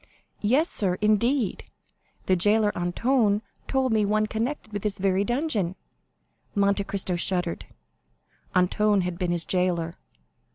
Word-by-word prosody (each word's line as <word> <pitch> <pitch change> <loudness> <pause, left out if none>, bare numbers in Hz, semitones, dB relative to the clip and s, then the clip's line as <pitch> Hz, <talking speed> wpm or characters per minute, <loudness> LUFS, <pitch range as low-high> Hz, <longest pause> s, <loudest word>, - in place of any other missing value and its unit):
"Yes, 260 +10 +3
sir; 190 - +1
indeed, 215 +2 +1 0.6
the 185 - +3
jailer 205 +3 +3
Antoine 210 +4 +1 0.2
told 265 -3 +1
me 215 -1 +3
one 215 +1 +2
connected 220 +1 -3
with 205 - -3
this 210 -1 -2
very 195 0 +1
dungeon." 240 - -1 0.8
Monte 200 0 +2
Cristo 190 -2 -2
shuddered; 175 -1 -1 0.9
Antoine 200 +3 +3
had 180 -1 -4
been 180 - -1
his 175 -1 -1
jailer. 175 -2 -1
205 Hz, 125 wpm, -26 LUFS, 180-220 Hz, 0.9 s, Yes